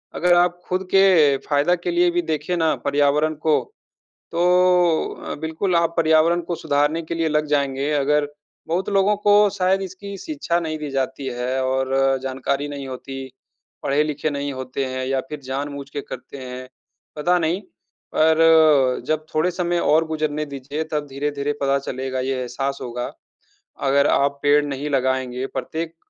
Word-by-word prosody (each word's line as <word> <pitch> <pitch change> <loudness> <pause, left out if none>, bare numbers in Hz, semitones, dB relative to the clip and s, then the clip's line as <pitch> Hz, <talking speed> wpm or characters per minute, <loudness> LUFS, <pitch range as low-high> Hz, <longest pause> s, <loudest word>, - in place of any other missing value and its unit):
अगर 180 +1 +3
आप 175 0 +2
ख़ुद 185 +1 0
के 175 -8 +5
फ़ायदा 145 +4 +3
के 175 0 -3
लिए 175 0 +3
भी 175 - +1
देखे 160 +1 -2
ना 160 -2 +2
पर्यावरण 145 +2 +2
को 155 -1 +4 0.7
तो 170 - -1 0.8
अ, - - -4
बिल्कुल 160 +4 -1
आप 170 0 +2
पर्यावरण 165 +1 +4
को 170 +1 -4
सुधारने 150 +1 0
के 165 +1 -5
लिए 165 -1 0
लग 150 0 +1
जाएँगे। 140 -1 0
अगर 145 +1 +2 0.4
बहुत 175 +3 -1
लोगों 200 +1 +3
को 205 0 +5
शायद 190 0 +1
इसकी 195 +2 -7
शिक्षा 280 - -2
नहीं 160 -2 -3
दी 150 -1 -5
जाती 135 0 -2
हैं 125 +2 -1
और 130 0 0 0.3
जानकारी 135 +2 -2
नहीं 140 -2 -6
होती। 135 +1 -7 0.6
पढ़े-लिखे 150 +1 0
नहीं 140 -1 -3
होते 130 +1 -4
हैं 130 0 -3
या 135 0 0
फ़िर 150 -1 -6
जानबूझ 140 +1 -5
के 145 - -5
करते 135 +1 -9
हैं। 130 0 -8 0.5
पता 175 +4 +2
नहीं, 170 +4 0 0.5
पर 155 -4 +5
जब 155 0 -1
थोड़े 155 +4 +2
समय 175 -1 -1
और 160 0 +3
गुज़रने 155 -1 -2
दीजिए 140 +2 -5
तब 150 -1 -2
धीरे-धीरे 145 +1 -2
पता 140 0 +2
चलेगा 130 -1 -4
ये 130 +1 -1
एहसास 135 +3 -3
होगा। 120 0 -4 0.8
अगर 140 +1 +4
आप 140 0 +1
पेड़ 145 +1 +4
नहीं 145 +1 -4
लगाएँगे 130 -2 0
प्रत्येक 165 +3 -5
150 Hz, 160 wpm, -22 LUFS, 135-165 Hz, 0.8 s, के